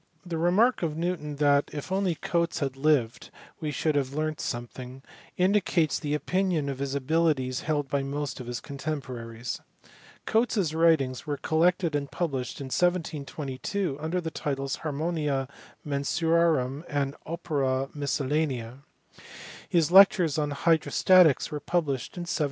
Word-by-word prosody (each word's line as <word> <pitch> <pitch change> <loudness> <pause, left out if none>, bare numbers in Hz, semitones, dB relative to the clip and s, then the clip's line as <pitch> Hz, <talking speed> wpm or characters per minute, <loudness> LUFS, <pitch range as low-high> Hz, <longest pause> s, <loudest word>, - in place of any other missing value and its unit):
Tin 165 -2 -3
remark 205 +9 +3
of 160 -3 -2
Newton 165 -4 -2
that 145 0 +3
if 150 +4 -6
only 190 -3 +1
Cotes 170 0 -1
had 135 -2 -2
lived 135 -5 +1 0.2
" - - -25
we 155 - -2
should 155 +1 0
have 140 -1 -1
learnt 155 0 -2
some 120 0 -3
thing" 130 +2 -10 0.3
indicates 185 -4 +2
the 150 -2 -1
opinion 180 -2 0
of 135 -1 -4
his 140 0 -2
abilities 140 -3 +1
held 150 -2 -1
by 140 +1 0
most 140 +1 -4
of 125 - -7
his 120 0 -3
contemporaries. 125 -5 -5 0.6
Colon 225 +2 +3
s 170 -6 +1
writings 160 -6 +2
were 145 -1 -1
collected 165 +3 +1
and 140 -1 -1
published 135 -8 -3
in 140 - -5
1722 155 0 -1
under 160 +4 -1
the 165 -2 -4
titles 135 -3 -3
Ha/nn&nMi 155 +1 -2
Af&nsurci/rufn 140 +1 0
and 140 -1 -1
Opera 140 -6 -1
MisceL 145 -1 -1
latifia. 130 -5 -1 0.9
His 170 -2 +2
lectures 185 -5 +6
on 150 -1 0
hydrostatics 165 +2 +4
were 150 - -3
published 145 -3 -2
in - - -3
1738. 175 0 -3
150 Hz, 145 wpm, -27 LUFS, 135-170 Hz, 0.9 s, lectures